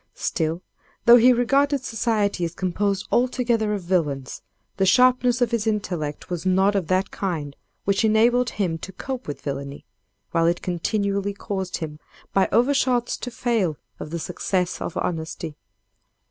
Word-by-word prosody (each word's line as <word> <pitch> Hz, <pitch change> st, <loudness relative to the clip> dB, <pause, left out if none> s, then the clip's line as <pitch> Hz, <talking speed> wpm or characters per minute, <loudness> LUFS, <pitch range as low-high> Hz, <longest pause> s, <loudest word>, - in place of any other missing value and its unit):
Still, 165 Hz, +2 st, -2 dB, 0.4 s
though 240 Hz, 0 st, +9 dB
he 245 Hz, +2 st, +6 dB
regarded 275 Hz, +3 st, +2 dB
society 210 Hz, -5 st, 0 dB
as 170 Hz, 0 st, -3 dB
composed 195 Hz, +2 st, -1 dB
altogether 240 Hz, -3 st, +1 dB
of 195 Hz, -, -5 dB
villains, 150 Hz, -7 st, -1 dB, 0.4 s
the 190 Hz, -, +3 dB
sharpness 250 Hz, +3 st, +4 dB
of 240 Hz, -, -1 dB
his 230 Hz, -2 st, 0 dB
intellect 180 Hz, -9 st, -2 dB
was 175 Hz, -3 st, -4 dB
not 190 Hz, +2 st, +3 dB
of 195 Hz, -5 st, -1 dB
that 185 Hz, +2 st, +1 dB
kind 155 Hz, -7 st, -3 dB, 0.3 s
which 200 Hz, +2 st, +2 dB
enabled 235 Hz, +3 st, +4 dB
him 175 Hz, -5 st, 0 dB
to 190 Hz, -, -7 dB
cope 260 Hz, +6 st, -5 dB
with 145 Hz, -, -5 dB
villany, 140 Hz, 0 st, -5 dB, 0.5 s
while 165 Hz, -1 st, +2 dB
it 175 Hz, +1 st, 0 dB
continually 200 Hz, +3 st, -1 dB
caused 190 Hz, -3 st, -4 dB
him 150 Hz, -2 st, -6 dB, 0.3 s
by 195 Hz, -, +3 dB
overshots 250 Hz, -1 st, +2 dB
to 245 Hz, -, -4 dB
fail 225 Hz, -, 0 dB, 0.2 s
of -, -, -6 dB
the 170 Hz, -, -3 dB
success 180 Hz, +2 st, -2 dB
of 165 Hz, -, -4 dB
honesty. 160 Hz, -2 st, -3 dB
195 Hz, 150 wpm, -23 LUFS, 170-235 Hz, 0.5 s, though